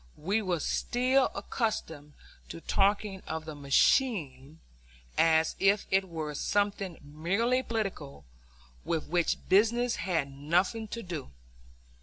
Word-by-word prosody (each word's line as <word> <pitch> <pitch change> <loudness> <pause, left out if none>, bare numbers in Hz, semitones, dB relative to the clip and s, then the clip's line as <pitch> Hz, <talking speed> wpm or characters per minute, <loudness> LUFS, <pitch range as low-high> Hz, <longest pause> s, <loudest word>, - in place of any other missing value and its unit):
We 200 +8 0
were 180 -5 -1
still 255 - +1
accustomed 160 - -3 0.4
to - - -7
talking 195 +2 +1
of 160 0 -4
the 155 - -6
"machine" 145 - +1 0.6
as 160 -1 +3
if 200 +1 +3
it 190 -1 +2
were 155 -3 -4
something 200 +1 -1
merely 195 - 0
political, 195 - -4 0.6
with 165 -2 -2
which 175 0 0
business 235 +5 +3
had 165 -7 -1
nothing 180 +11 0
to 230 +2 -6
do. 170 - -6
185 Hz, 115 wpm, -29 LUFS, 155-215 Hz, 0.6 s, as